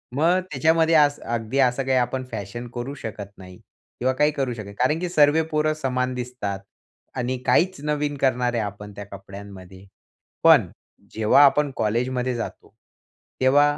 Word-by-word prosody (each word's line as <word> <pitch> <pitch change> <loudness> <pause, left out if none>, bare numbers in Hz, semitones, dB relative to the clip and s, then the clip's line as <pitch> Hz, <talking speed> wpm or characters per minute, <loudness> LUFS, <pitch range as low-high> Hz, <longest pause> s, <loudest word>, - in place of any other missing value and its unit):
मग 170 +6 +3
त्याच्यामध्ये 160 +3 +3
असं 145 -2 +3
अगदी 115 +3 -2
असं 130 0 +2
काही 130 -1 +2
आपण 125 +1 -1
फॅशन 110 +2 -6
करू 120 +3 -4
शकत 100 -5 -8
नाही 90 -1 -12 0.4
किंवा 130 +2 +1
काही 150 +3 +2
करू 135 -4 -2
शकत 110 -3 -8
नाही. 100 0 -11
कारण 150 +6 +2
की 180 0 -3
सर्व 155 -1 +4
पोरं 155 0 +1
समान 130 -4 -2
दिसतात 125 -6 -4 0.6
आणि 125 +1 -1
काहीच 180 +8 +2
नवीन 150 -1 -1
करणार 125 -2 +1
आहे 115 - 0
आपण 105 0 -7
त्या 100 - -7
कपड्यांमध्ये, 100 -1 -11 0.6
पण - - +6 0.5
जेव्हा 110 +6 +5
आपण 145 +1 +3
कॉलेजमध्ये 125 +3 -1
जातो 120 - -7 0.7
तेव्हा, 145 +3 +4
125 Hz, 155 wpm, -23 LUFS, 110-145 Hz, 0.7 s, पण